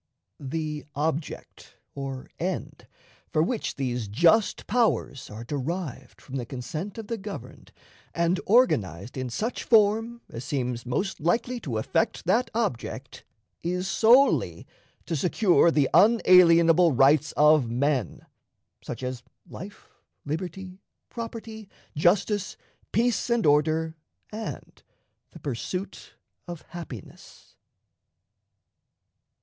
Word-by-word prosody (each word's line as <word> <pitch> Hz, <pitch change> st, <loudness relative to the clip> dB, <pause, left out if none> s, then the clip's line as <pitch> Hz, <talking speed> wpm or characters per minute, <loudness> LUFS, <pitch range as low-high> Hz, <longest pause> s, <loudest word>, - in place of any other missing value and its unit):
The 150 Hz, +1 st, -4 dB
object, 155 Hz, +1 st, -4 dB, 0.2 s
or 135 Hz, -2 st, -6 dB
end, -, -, -4 dB, 0.4 s
for 155 Hz, -, +3 dB
which 225 Hz, +6 st, -2 dB
these 125 Hz, -5 st, -2 dB
"just 170 Hz, -, +3 dB
powers" 220 Hz, -, 0 dB
are 110 Hz, +2 st, -8 dB
derived 145 Hz, +3 st, -5 dB
from 135 Hz, 0 st, -7 dB
the 125 Hz, -, -4 dB
consent 155 Hz, -, -6 dB
of 225 Hz, -, -6 dB
the 230 Hz, +1 st, -4 dB
governed 200 Hz, +1 st, -9 dB, 0.4 s
and 170 Hz, +2 st, +1 dB
organized 110 Hz, -, +2 dB
in 130 Hz, -1 st, -3 dB
such 225 Hz, -, -3 dB
form 225 Hz, +2 st, +3 dB
as 115 Hz, -, -8 dB
seems 125 Hz, -4 st, -3 dB
most 190 Hz, +10 st, -2 dB
likely 235 Hz, +10 st, 0 dB
to 130 Hz, -, -4 dB
effect 220 Hz, -, -1 dB
that 245 Hz, +3 st, +2 dB
object, 130 Hz, -, -3 dB, 0.4 s
is 180 Hz, +2 st, -2 dB
solely 240 Hz, +7 st, +4 dB, 0.4 s
to 165 Hz, -, -2 dB
secure 175 Hz, +3 st, +3 dB
the 150 Hz, -4 st, +2 dB
unalienable 175 Hz, -6 st, +6 dB
rights 140 Hz, +3 st, +4 dB
of 150 Hz, -4 st, +4 dB
men 130 Hz, -, -1 dB, 0.6 s
such -, -, -7 dB
as 125 Hz, -1 st, -4 dB, 0.3 s
life, 200 Hz, +4 st, -10 dB, 0.4 s
liberty, 180 Hz, +4 st, -5 dB, 0.3 s
property, 225 Hz, -2 st, -7 dB, 0.3 s
justice, 185 Hz, +5 st, +1 dB, 0.3 s
peace 235 Hz, +3 st, +1 dB
and 235 Hz, -2 st, +1 dB
order, 155 Hz, +2 st, +2 dB, 0.4 s
and 220 Hz, +1 st, -7 dB, 0.5 s
the 165 Hz, -, -13 dB
pursuit 150 Hz, +8 st, -5 dB, 0.3 s
of 175 Hz, -2 st, -7 dB
happiness. 150 Hz, -, -11 dB
165 Hz, 110 wpm, -26 LUFS, 135-210 Hz, 0.6 s, unalienable